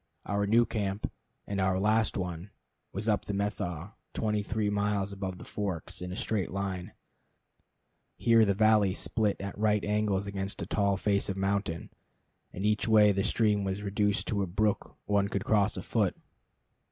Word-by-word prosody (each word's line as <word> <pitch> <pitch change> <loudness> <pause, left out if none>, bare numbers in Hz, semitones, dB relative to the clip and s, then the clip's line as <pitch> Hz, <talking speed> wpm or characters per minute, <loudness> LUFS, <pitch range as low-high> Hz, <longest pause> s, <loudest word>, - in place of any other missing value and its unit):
Our 100 0 0
new 115 +3 +5
camp 100 -2 -2 0.3
and 100 -1 -2
our 95 0 +2
last 110 +2 +2
one 90 0 -4 0.4
was 100 +3 -4
up 105 -2 +1
the 100 - -3
Methow, 100 -3 -3 0.2
twenty 105 -1 0
three 105 0 -1
miles 100 -1 0
above 95 -2 -4
the - - -10
Forks, 95 -6 -4
in 90 0 -5
a - - -4
straight 100 -3 -1
line. 95 -2 -4 1.2
Here 115 -1 +5
the 100 -2 +2
valley 105 -2 +4
split 105 -3 0
at 100 0 -5
right 105 0 +1
angles 105 -2 +1
against 100 0 -4
a - - -4
tall 100 -2 +1
face 100 +1 +1
of 95 - -2
mountain, 95 -4 -1 0.6
and 95 - -4
each 105 +1 +1
way 105 -2 +6
the 100 0 0
stream 105 -2 +2
was 95 +1 -2
reduced 100 0 +1
to 100 -2 0
a 95 - -1
brook 105 +4 -1
one 100 -1 +2
could 100 -1 -3
cross 105 -1 +2
afoot. - - 0
100 Hz, 170 wpm, -30 LUFS, 95-105 Hz, 1.2 s, way